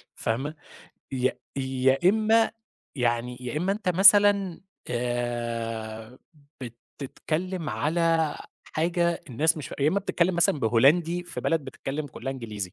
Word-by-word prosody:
فاهمة، 135 +7 -2 0.6
يا 130 -1 0 0.2
يا 130 0 +1
إمّا 220 +2 +3 0.5
يعني 120 0 -1
يا 125 +3 -5
إمّا 180 +5 +1
أنت 205 -2 -4
مثلًا 195 0 +5 0.3
آآ، 120 -1 -3 0.8
بتتكلم 165 +5 -3
على 165 -1 +1 0.4
حاجة 170 +1 0
الناس 155 +7 +2
مش 150 - -6
فاه - - -8
يا 145 - +4
إمّا 190 +6 +1
بتتكلم 185 -2 0
مثلًا 175 -3 +2
بهولندي 155 +10 +3
في 175 - -6
بلد 165 -1 +1
بتتكلم 135 +2 -5
كُلها 135 -1 -6
إنجليزي، 105 -8 -6
145 Hz, 125 wpm, -26 LUFS, 120-175 Hz, 0.8 s, مثلًا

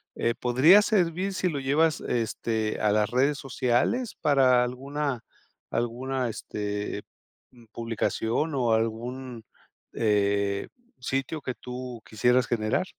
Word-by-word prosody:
eh, 115 - 0
podría 130 - +6
servir 190 -2 +1
si 185 - 0
lo 145 -4 -3
llevas, 150 +4 +2
este, 110 -2 -1
a 105 - +3
las 105 0 +2
redes 135 +4 +2
sociales 135 - 0
para 130 -4 +4
alguna 135 +1 -3 0.5
alguna, 125 +3 -2
este, 105 -1 -4 0.5
mm, 120 -2 -18
publicación 115 +5 -1
o 120 -4 +1
algún, 115 +2 -3 0.5
eh, 100 -2 +1 0.3
sitio 135 +4 -2
que 130 - -3
tú 125 +1 -7
quisieras 125 +4 +2
generar? 115 +9 0
125 Hz, 115 wpm, -27 LUFS, 115-140 Hz, 0.5 s, podría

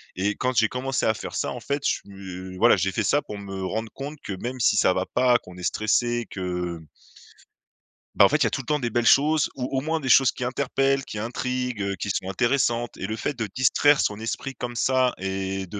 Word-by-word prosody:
Et 100 +3 0
quand 130 0 -1
j'ai 110 -1 +4
commencé 130 +2 -2
à 110 - +3
faire - - -7
ça, - - -1
en 125 - -6
fait, 140 +4 -3
je - - +4
su - - -9
heu, 95 -1 -8
voilà 120 +4 +6
j'ai 95 +1 0
fait - - -1
ça 145 - +2
pour 105 - -8
me 95 -1 -6
rendre 110 +3 -3
compte 145 +3 -7
que, 100 - -4
même 125 +7 -5
si 105 - +3
ça 95 - +4
va 95 - -1
pas, 125 -1 +3
qu'on 90 0 -14
est 90 - -9
stressé, 120 +3 0
que 90 -2 -4 1.4
bah, - - +7
en - - +7
fait, - - +3
il - - +2
y - - +4
a - - 0
tout - - -3
le 125 - -17
temps 150 -1 0
des 120 - -1
belles 120 +1 0
choses 150 +3 +4
ou, 125 -2 -3
au - - +1
moins, 160 +2 -1
des 135 - -5
choses 130 0 +6
qui 125 - -5
interpellent, 135 +1 0
qui 105 - -6
intriguent, 125 0 -3
heu, 100 0 -1
qui 100 - -4
sont 95 0 -2
intéressantes. 120 +1 0
Et 95 - -5
le 110 +2 -4
fait 145 - -2
de 115 - -1
distraire 140 +3 +4
son 105 - 0
esprit 135 +4 -4
comme 120 -1 -5
ça, 130 0 +2
et 95 0 -3
de, 100 - -7
120 Hz, 250 wpm, -25 LUFS, 95-130 Hz, 1.4 s, bah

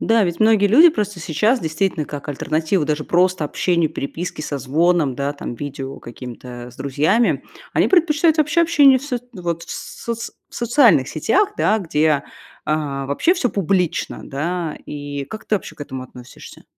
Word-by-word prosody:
Да, 225 -2 +3
ведь 170 -1 -3
многие 220 -2 +5
люди 285 - +7
просто 210 - -3
сейчас 210 - +1
действительно, 160 -1 -1
как 145 0 -7
альтернатива 155 +4 0
даже 150 0 -1
просто 180 -1 +2
общению, 170 +1 0
переписке, 160 +2 -5
созвонам, 150 +1 +1
да, 140 +3 -2
там, 120 - -6
видео 135 +1 -6
каким-то, 125 +1 -9 0.2
э, 125 - -10
с 120 - -18
друзьями. 145 - +1 0.3
Они - - +4
предпочитают 325 -2 +3
вообще 310 +3 +3
общение 285 -6 +5
в - - -13
соц 250 -4 -3
вот 170 -2 -3
в - - -11
соц 230 -1 -5 0.2
в - - -15
социальных 235 - +4
сетях, 395 - +1
да, 215 - +3
где, 155 -5 +1 0.4
а, 145 -3 -2
вообще 145 - +2
всё 255 -10 0
публично, 185 -3 -1
да, 165 +3 -3
и 145 -1 -5
как 215 +8 -8
ты 215 - +2
вообще 190 - -9
к 145 - -7
этому 130 -2 -6
относишься? 125 -1 -13
170 Hz, 170 wpm, -20 LUFS, 145-225 Hz, 0.4 s, люди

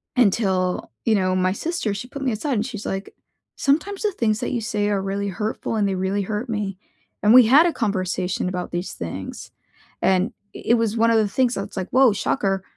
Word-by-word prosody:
Until, 190 -6 +1
you 225 - +4
know, 185 -2 +1
my 185 0 +2
sister, 275 - -2
she 205 +5 -6
put 280 +2 -8
me 260 -3 0
aside 265 +7 -2
and 220 -2 0
she's 215 -5 -6
like, 195 +1 -4 0.4
"Sometimes 325 +8 0
the 425 - +1
things 220 - 0
that 245 - -3
you 240 - -1
say 210 -2 -1
are 200 -2 0
really 200 +1 -2
hurtful, 210 +3 -3
and 205 -2 +2
they 195 - -1
really 190 +2 -1
hurt 210 +5 -4
me." 205 -4 -3 0.4
And 210 +2 +5
we 250 -1 +9
had 285 +8 +7
a 345 - +1
conversation 185 -4 -1
about 180 -1 -4
these 175 +2 -3
things, 90 +3 -7 0.5
and 190 +3 +2
i - - -38 0.4
it - - +7
was 230 -1 0
one 230 +1 +4
of 225 - +4
the 215 -1 +3
things 250 +4 +1
that's 195 - -6
like, 190 -1 -3
whoa, 255 -3 +5
shocker. 195 -1 -1
210 Hz, 215 wpm, -22 LUFS, 190-240 Hz, 0.5 s, we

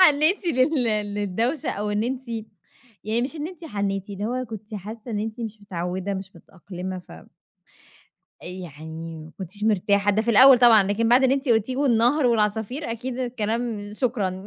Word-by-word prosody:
حنيتِ 330 +3 +4
لل 260 -2 +2 0.3
للدوشة 225 - -1
أو 210 +1 -3
إن 210 +1 0
أنتِ 260 0 -4 0.8
يعني 220 +3 0
مش 275 +6 -4
إن 300 0 -3
أنتِ 350 -2 -12
حنيتِ، 200 - -3
اللي 200 +1 -5
هو 255 +2 -2
كنتِ 220 -1 -9
حاسة 215 +4 -8
إن 210 - -2
أنتِ 220 +2 -5
مش 220 -2 -6
متعودة 185 +1 -3
مش 190 0 -6
متأقلمة 185 0 -8
ف 180 - -14 1.3
يعني 165 -2 -8
ما 155 - -12
كنتيش 190 +2 -6
مرتاحة 205 -1 +2
ده 210 +2 +1
في 235 - 0
الأول 255 +3 +8
طبعًا، 235 -4 +7
لكن 205 +4 0
بعد 245 +3 +6
اللي 265 +1 +4
أنتِ 275 0 -3
قُلتيه 230 +2 +2
والنهر 255 +1 +3
والعصافير 225 +4 0
أكيد 240 +2 -4
الكلام، 230 -3 -2
شكرًا. 205 -5 -2
220 Hz, 165 wpm, -24 LUFS, 200-250 Hz, 1.3 s, الأول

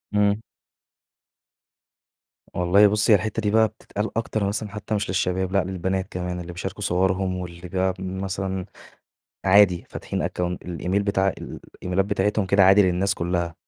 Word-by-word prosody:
إمم. 105 +1 +2 2.1
والله 90 +4 +5
بُصّي 105 +3 +2
هي - - +9
الحتّة 110 +1 -1
دي 105 - 0
بقى 110 +1 +5
بتتقال 105 +1 -5
أكتر 110 -2 -1
مثلًا 105 +1 -2
حتّى 105 +1 -4
مش 105 - -2
للشباب، 90 0 0
لأ 100 -1 +2
للبنات 95 0 -2
كمان 90 0 -4
اللي 90 0 -7
بيشاركوا 95 +3 -6
صورهم 95 0 +1
واللي 90 0 -7
بقى 95 +1 0
مثلًا 95 0 -3 0.8
عادي 95 -2 +5
فاتحين - - -4
أكّون 90 0 -2
الإيميل 90 +3 -2
بتاع 100 -1 +1
ال 95 - -6 0.2
الإيميلات 90 +2 0
بتاعتهم 105 0 0
كده 100 +1 +4
عادي 95 +2 +7
للناس 95 +1 +1
كُلّها. 85 -1 -2
95 Hz, 150 wpm, -24 LUFS, 90-100 Hz, 2.1 s, هي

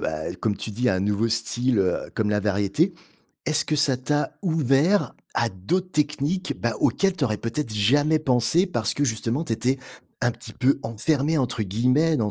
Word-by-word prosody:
bah, 80 0 -3
comme 105 -3 0
tu - - -5
dis, 125 +4 0
un 95 -4 +1
nouveau 105 +3 0
style, 115 +1 0
heu, 95 -2 0
comme 110 -2 0
la 105 0 +1
variété, 105 - +1 0.5
est-ce 155 0 +2
que 155 - 0
ça 145 -3 +3
t'a 145 +4 -1
ouvert 160 +3 +2 0.2
à 115 - +1
d'autres 175 - -2
techniques, 150 +4 -1
bah, 120 - 0
auxquelles 185 +9 +2
tu 150 - -6
aurais 105 -3 0
peut-être 115 +2 -3
jamais 145 +9 +3
pensé 145 - +2
parce 120 - -1
que 145 - +1
justement 115 +5 -1
tu 120 - -3
étais 125 +4 0 0.4
un 120 -1 +1
petit 120 +2 -12
peu 135 +2 +1
enfermée 140 +7 0
entre 125 -4 -1
guillemets 125 - +2
dans 105 -4 0
125 Hz, 185 wpm, -24 LUFS, 110-150 Hz, 0.5 s, ça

